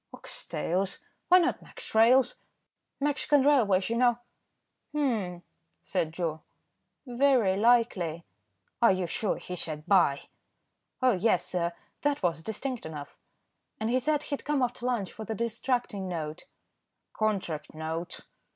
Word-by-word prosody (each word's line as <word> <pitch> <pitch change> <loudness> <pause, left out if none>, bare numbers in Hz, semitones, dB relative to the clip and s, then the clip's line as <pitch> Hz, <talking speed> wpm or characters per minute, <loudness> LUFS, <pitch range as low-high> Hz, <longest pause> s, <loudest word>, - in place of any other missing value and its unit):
"Ox - - -7
tails. 190 +3 -1 0.3
Why 365 - +8
not 350 -1 +1
Mex. - - -10
Rails.? 240 +3 +5 0.7
Mexican 290 0 +2
Railways, 215 -10 +4
you 230 - -1
know." 240 -1 +4 0.8
"Humph," 215 -12 -1 0.4
said 165 -4 -1
Joe, 165 -2 -3 0.6
"very 245 -6 +3
likely." 200 -7 +2 0.6
"Are 235 - +7
you 185 -1 0
sure 195 +5 -1
he 180 - -7
said 155 -3 -4
'buy?'" 175 -8 +4 0.8
"Oh! 255 - +6
yes, 190 -2 +2
sir, 170 -1 -1 0.3
that 290 -5 0
was 165 -2 +1
distinct 240 +6 -4
enough, 150 -3 -8 0.6
and 220 +2 -1
he 255 - +3
said 300 +2 0
he'd 285 - -4
come 290 -3 +1
after 245 0 -2
lunch 225 -7 -1
for 220 - -8
the 220 +1 -4
distracting 230 -2 -1
note." 160 -3 -5 0.7
"Contract 190 -9 -2
note." 160 +3 -4
215 Hz, 135 wpm, -29 LUFS, 175-250 Hz, 0.8 s, Why